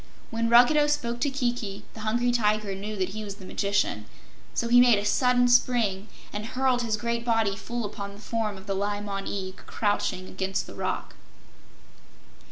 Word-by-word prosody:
When 230 0 0
Ruggedo 250 +6 +6
spoke 250 -5 -1
to 285 - +1
Kiki, 240 -6 -2
the - - -11
Hungry 240 +3 +1
Tiger 215 -3 +1
knew 205 +3 -5
that 190 -2 -1
he 215 +2 -6
was 200 -2 -6
the 190 - -12
magician, 200 - -1 0.5
so 235 - 0
he 245 +1 +7
made 240 -3 +6
a 205 - -2
sudden 250 +2 +3
spring 235 -5 +2 0.3
and 205 - -3
hurled 255 +2 +1
his 225 -2 0
great 235 +1 -2
body 225 -4 +1
full 235 +2 -4
upon 200 -1 -6
the - - -13
form 215 -2 -2
of 190 - -12
the 200 - -2
Li 205 +1 -1
Mon 200 -1 -4
Eag 190 -1 -4
crouching 200 -3 -1
against 190 0 -2
the - - -10
rock. - - -3
215 Hz, 180 wpm, -27 LUFS, 200-240 Hz, 0.5 s, he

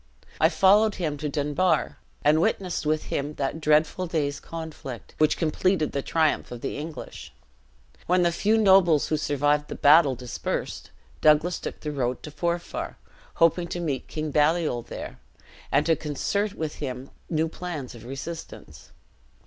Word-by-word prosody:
I 160 - +5
followed 200 +5 +4
him 160 -6 -2
to 150 +1 -3
Dunbar, 150 +5 0 0.2
and 155 +2 +4
witnessed 180 -3 -1
with 155 0 +1
him 145 +2 -2
that 140 +4 -3
dreadful 155 +4 +2
day's 145 -4 -1
conflict, 160 -7 -8
which 155 0 +3
completed 165 +1 +1
the 140 - -2
triumph 160 +2 +1
of 120 -1 -7
the - - -3
English. 155 +2 -7 0.8
When 180 0 +3
the 170 - +3
few 210 +6 +2
nobles 190 -7 +5
who 155 - +2
survived 145 0 +1
the - - -6
battle 145 -2 +6
dispersed, 125 0 -4 0.3
Douglas 155 +3 +4
took - - -7
the 150 - -3
road 125 -3 -2
to 150 - -7
Forfar, 170 +2 -3 0.4
hoping 170 +1 +3
to 175 - -4
meet 150 -6 -3
King 155 -1 -4
Baliol 150 -3 +2
there, - - -8 0.5
and 145 +2 +3
to 165 - +4
concert 200 +8 -2
with 155 -2 -4
him 130 -2 -5 0.2
new 160 -1 +1
plans 160 -5 -6
of 115 -2 -12
resistance. 135 - -8
155 Hz, 155 wpm, -26 LUFS, 145-170 Hz, 0.8 s, battle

